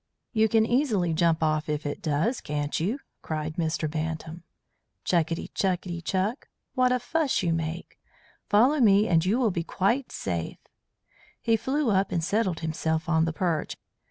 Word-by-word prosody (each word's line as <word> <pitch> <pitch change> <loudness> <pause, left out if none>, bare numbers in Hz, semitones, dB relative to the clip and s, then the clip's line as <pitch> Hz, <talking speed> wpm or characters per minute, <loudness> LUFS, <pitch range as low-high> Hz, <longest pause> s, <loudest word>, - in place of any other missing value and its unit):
"You 220 -1 +3
can 220 0 +4
easily 225 - +1
jump 165 0 +2
off 155 0 0
if 150 0 -2
it 145 - -4
does, 160 - 0
can't 145 0 -2
you?" 200 - 0 0.2
cried 155 +1 -4
Mr. 160 -1 0
Bantam. 160 +2 -4 0.6
"Chukitty 165 -1 0
chukitty 180 -2 -1
chuk! 195 - -1 0.3
What 255 -1 +3
a 250 - +3
fuss 285 +3 0
you 170 -2 +1
make! 165 +1 -4 0.5
Follow 250 +9 +4
me 210 -3 +5
and 165 -2 +3
you 195 +6 +2
will 240 -5 +2
be 170 -2 -2
quite 235 +10 0
safe." 85 -3 -3 0.8
He 230 - +2
flew 260 +3 0
up 195 0 +1
and 170 - 0
settled 195 -2 0
himself 160 0 -1
on 160 -1 +3
the 165 - -2
perch. 165 -3 -1
175 Hz, 160 wpm, -27 LUFS, 160-220 Hz, 0.8 s, me